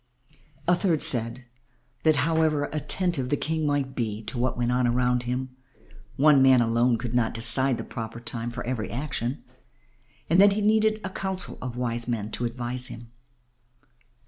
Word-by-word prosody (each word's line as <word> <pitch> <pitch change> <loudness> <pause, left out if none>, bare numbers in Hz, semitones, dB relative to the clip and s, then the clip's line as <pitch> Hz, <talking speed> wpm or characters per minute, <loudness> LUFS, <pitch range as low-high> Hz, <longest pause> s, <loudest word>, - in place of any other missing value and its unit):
A 180 - +5
third 170 -5 +1
said 125 -4 +1 0.6
that 155 -1 +3
however 160 -2 +1
attentive 155 -3 -1
the 145 - +1
King 160 +1 -1
might 140 -2 -1
be 110 -3 -3
to 120 +3 -5
what 125 +1 -1
went 120 0 0
on 125 0 +2
around 125 0 +1
him, 130 +1 -3 0.6
one 145 -1 +5
man 130 -1 +6
alone 120 +1 +2
could 120 0 -5
not 120 -2 +1
decide 120 +3 +2
the - - -5
proper 115 0 -7
time 115 0 -4
for 125 +1 -6
every 120 -3 -3
action 135 -1 -4 0.8
and 170 +4 +4
that 200 0 +6
he 210 - -1
needed 215 +1 +2
a 190 - -3
council 190 -1 -4
of 125 -1 -5
wise 120 -1 -2
men 110 -3 -3
to 120 - -2
advise 125 +1 0
him. 115 -2 -10
125 Hz, 170 wpm, -26 LUFS, 120-155 Hz, 0.8 s, man